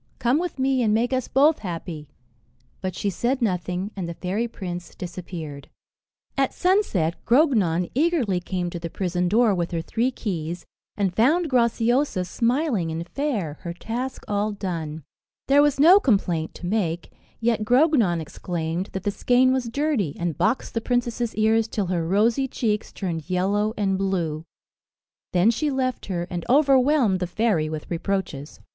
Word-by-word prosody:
Come 250 Hz, +5 st, +2 dB
with 355 Hz, -3 st, -3 dB
me, 265 Hz, -1 st, +1 dB
and 215 Hz, -2 st, +2 dB
make 240 Hz, +3 st, +1 dB
us 260 Hz, -1 st, 0 dB
both 295 Hz, +4 st, +4 dB
happy." 165 Hz, -5 st, -6 dB, 0.7 s
But 185 Hz, -2 st, -3 dB
she 200 Hz, -, -1 dB
said 245 Hz, +8 st, 0 dB
nothing, 185 Hz, -2 st, -1 dB
and 180 Hz, -4 st, -4 dB
the 170 Hz, -, -6 dB
fairy 200 Hz, +8 st, -2 dB
prince 180 Hz, -5 st, -7 dB
disappeared. 170 Hz, -5 st, -7 dB, 0.7 s
At 270 Hz, -2 st, 0 dB
sunset, 355 Hz, -, +1 dB
Grognon 215 Hz, -, +3 dB
eagerly 270 Hz, -, +1 dB
came 180 Hz, -1 st, -3 dB
to 175 Hz, -, -5 dB
the 170 Hz, 0 st, -5 dB
prison 180 Hz, 0 st, -1 dB
door 220 Hz, +1 st, +4 dB
with 175 Hz, -2 st, -1 dB
her 165 Hz, -1 st, -2 dB
three 235 Hz, +8 st, 0 dB
keys, 175 Hz, -8 st, -4 dB, 0.3 s
and 195 Hz, -3 st, 0 dB
found 310 Hz, +8 st, +3 dB
Graciosa 235 Hz, -3 st, +2 dB
smiling 235 Hz, -, 0 dB
and 165 Hz, +2 st, -4 dB
fair, 215 Hz, -, -2 dB
her 170 Hz, -, -5 dB
task 245 Hz, +7 st, -4 dB
all 205 Hz, +1 st, 0 dB
done. 165 Hz, -6 st, -4 dB, 0.4 s
There 280 Hz, +1 st, +6 dB
was 290 Hz, -2 st, +2 dB
no 350 Hz, +7 st, +8 dB
complaint 180 Hz, -, 0 dB
to -, -, -8 dB
make, 175 Hz, -4 st, -1 dB, 0.3 s
yet 230 Hz, -2 st, +1 dB
Grognon 245 Hz, -, +3 dB
exclaimed 165 Hz, +2 st, -4 dB
that 190 Hz, -, -4 dB
the 205 Hz, -, 0 dB
skein 250 Hz, +4 st, +3 dB
was 255 Hz, -3 st, -1 dB
dirty, 260 Hz, -, 0 dB
and 170 Hz, -3 st, -1 dB
boxed 230 Hz, +4 st, 0 dB
the 230 Hz, -, -1 dB
princess's 240 Hz, -1 st, -1 dB
ears 220 Hz, +1 st, +3 dB
till 210 Hz, -3 st, -2 dB
her 165 Hz, -2 st, -1 dB
rosy 225 Hz, +8 st, +2 dB
cheeks 215 Hz, -4 st, -2 dB
turned 170 Hz, -4 st, -4 dB
yellow 200 Hz, +4 st, +1 dB
and 195 Hz, -2 st, 0 dB
blue. 170 Hz, -5 st, -1 dB, 0.9 s
Then 185 Hz, +5 st, +4 dB
she 295 Hz, +6 st, -1 dB
left 260 Hz, -2 st, -2 dB
her, 175 Hz, -3 st, -2 dB
and 175 Hz, -2 st, -3 dB
overwhelmed 270 Hz, -6 st, +4 dB
the 180 Hz, -, -2 dB
fairy 180 Hz, -5 st, +1 dB
with 155 Hz, +1 st, -6 dB
reproaches. 170 Hz, -5 st, -3 dB
205 Hz, 160 wpm, -24 LUFS, 175-250 Hz, 0.9 s, no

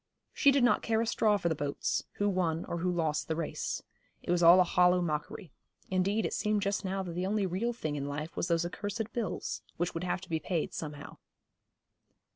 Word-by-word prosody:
She 280 Hz, -, +5 dB
did 275 Hz, -2 st, +4 dB
not 245 Hz, -, +4 dB
care 220 Hz, -1 st, +1 dB
a 230 Hz, -, +1 dB
straw 215 Hz, -2 st, +2 dB
for 175 Hz, -, -1 dB
the 165 Hz, -, +2 dB
boats, 145 Hz, -2 st, -2 dB
who 205 Hz, -, 0 dB
won, 175 Hz, -4 st, 0 dB
or 170 Hz, -, -3 dB
who 180 Hz, +2 st, 0 dB
lost 160 Hz, -3 st, 0 dB
the 160 Hz, -, -1 dB
race. 165 Hz, -1 st, -3 dB, 0.4 s
It -, -, -2 dB
was 175 Hz, 0 st, +2 dB
all 170 Hz, +2 st, +8 dB
a -, -, +7 dB
hollow 180 Hz, +1 st, +4 dB
mockery. 175 Hz, +3 st, -3 dB, 0.4 s
Indeed 195 Hz, +4 st, +1 dB
it -, -, -2 dB
seemed 210 Hz, -1 st, 0 dB
just 200 Hz, 0 st, -1 dB
now 190 Hz, 0 st, -2 dB
that 180 Hz, -, -5 dB
the 180 Hz, +2 st, -2 dB
only 205 Hz, 0 st, +1 dB
real 190 Hz, +7 st, -1 dB
thing 155 Hz, -11 st, -4 dB
in 140 Hz, -1 st, -3 dB
life 150 Hz, +3 st, -5 dB
was -, -, -1 dB
those 170 Hz, 0 st, +1 dB
accursed 205 Hz, +5 st, -4 dB
bills, 230 Hz, -5 st, -3 dB, 0.2 s
which 175 Hz, +1 st, -1 dB
would 165 Hz, -, -4 dB
have 180 Hz, 0 st, -1 dB
to 185 Hz, -, -12 dB
be 160 Hz, -1 st, 0 dB
paid 165 Hz, -1 st, -2 dB
somehow. 150 Hz, -2 st, -7 dB
180 Hz, 220 wpm, -31 LUFS, 165-205 Hz, 0.4 s, all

